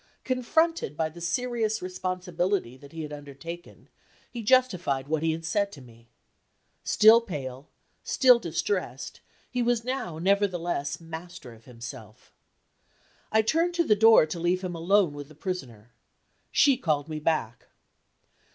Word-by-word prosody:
Confronted 260 - 0
by 160 -1 0
the 170 +2 -12
serious 220 +4 -1
responsibility 185 -4 -2
that 140 +2 -15
he 165 -1 -6
had 150 -1 -7
undertaken, 145 +4 -10 0.4
he 240 - -5
justified 185 - +2
what 155 0 0
he 165 0 +1
had 165 +1 -5
said 200 +4 0
to 145 - -10
me. 115 -2 -17 0.8
Still 220 +2 +6
pale, 140 - -7 0.3
still 250 -3 +5
distressed, 175 - -3 0.3
he 250 - -1
was 240 -1 +1
now 250 -10 -3
nevertheless 175 -5 0
master 165 -4 -9
of 110 0 -19
himself. 115 -3 -11 1.0
I 220 0 +4
turned 335 +9 +1
to 345 - +3
the 215 -9 +3
door 220 -4 +7
to 160 +2 -6
leave 180 +2 0
him 180 -1 -3
alone 175 0 +2
with 145 -1 -8
the 155 - -16
Prisoner. 130 - -6 0.6
She 275 -3 +4
called 155 - -1
me 155 -1 -5
back. 150 -7 -2
175 Hz, 140 wpm, -27 LUFS, 145-220 Hz, 1.0 s, door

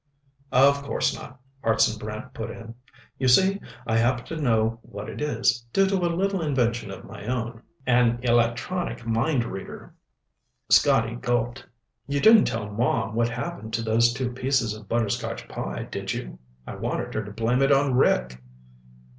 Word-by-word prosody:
"Of 140 +2 +5
course 140 - 0
not," 130 - -10 0.2
Hartson 110 -1 +2
Brant 110 0 -7
put 110 - -5
in. 115 0 -9 0.5
"You 130 - +1
see, 190 +10 +4 0.2
I 110 -1 +1
happen 120 +1 +1
to 165 - -6
know 115 -3 +1
what 100 -1 -8
it - - -7
is, 125 -4 +1
due 195 - +4
to 195 0 +1
a 175 -2 +1
little 195 0 0
invention 120 -7 0
of 95 - -8
my 100 - -10
own 120 -2 -3 0.2
an 120 -1 +3
electronic 120 +6 0
mind 120 +4 +1
reader." 95 -4 -8 0.8
Scotty 115 +1 +4
gulped. 120 +1 -2 0.4
"You 140 0 0
didn't 220 +5 +7
tell 110 -2 -2
Mom 110 -1 0
what 115 +1 +1
happened 120 -4 -5
to 115 - -2
those 115 +1 +3
two 125 0 -3
pieces 125 -3 0
of 110 -1 -11
butterscotch 115 0 -2
pie, - - -5
did - - -4
you? - - -7 0.3
I - - -7
wanted - - -3
her 110 - -2
to 105 - -9
blame 115 +4 0
it 135 +1 +4
on 140 -1 +3
Rick." 65 - +2
120 Hz, 165 wpm, -25 LUFS, 115-135 Hz, 0.8 s, didn't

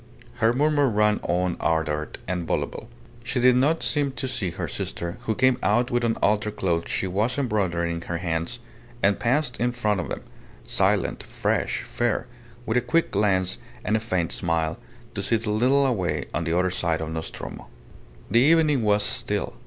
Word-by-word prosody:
Her 115 -1 +4
murmur 145 +1 +3
ran 105 -1 +2
on 90 0 0
ardent 75 -1 -1
and 90 -2 -2
voluble. - - -2 0.3
She 125 +1 -1
did 125 0 +5
not 145 +6 +2
seem 145 -3 0
to 130 - -3
see 110 -7 -1
her 85 - -4
sister, 85 +5 -4
who 110 - +1
came 130 -1 +3
out 120 +4 +2
with 120 0 +1
an 115 -1 +1
altar 105 +1 +2
cloth 85 -5 -1
she - - -1
was 105 +8 0
embroidering 90 -10 0
in - - -6
her 85 - -2
hands, 85 +5 -2 0.5
and 100 0 +3
passed 125 +1 0
in 125 +1 +1
front 105 -5 0
of - - -3
them, - - -5 0.4
silent, - - +1
fresh, - - -1
fair, 120 -2 -1 0.4
with 110 +1 +1
a - - +4
quick 145 +8 +1
glance 95 -3 +1 0.3
and 105 - +2
a - - +2
faint 95 - -1
smile, 80 +5 0 0.3
to - - -3
sit 110 +3 0
a 105 - 0
little 130 +6 +3
away 105 -9 0
on 85 - -1
the 85 +1 +1
other 90 0 +2
side 85 -3 0
of 80 0 -4
Nostromo. 80 0 -6 0.6
The 115 - +5
evening 150 -2 +4
was 105 -1 +3
still. - - 0
105 Hz, 185 wpm, -25 LUFS, 85-125 Hz, 0.6 s, did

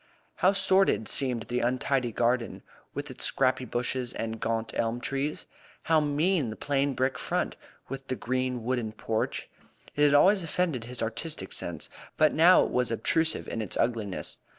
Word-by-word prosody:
How 185 - +4
sordid 190 - +3
seemed 125 -4 +1
the 120 +2 -2
untidy 125 0 0
garden, 120 +1 0 0.3
with 145 0 -4
its 130 - -4
scrappy 130 -1 +1
bushes 125 +1 -2
and 115 0 -4
gaunt 115 0 -2
elm 115 +1 0
trees! 140 +4 -2 0.4
How 160 -1 +4
mean 150 0 +1
the 110 - -5
plain 140 0 0
brick 130 +1 0
front, - - -1 0.3
with 135 0 -7
the 130 - -1
green 130 -1 -2
wooden 120 -3 -1
porch! 110 0 -2 0.5
It 145 - +2
had 145 -1 +5
always 190 +7 +5
offended 165 -8 -1
his 125 0 -4
artistic 115 +8 -3
sense, - - -4 0.3
but 155 -1 +4
now 175 +3 +7
it - - -3
was 125 0 +1
obtrusive 160 +7 +1
in 115 - -3
its 105 - -3
ugliness. 115 -5 -1
130 Hz, 165 wpm, -28 LUFS, 115-145 Hz, 0.5 s, now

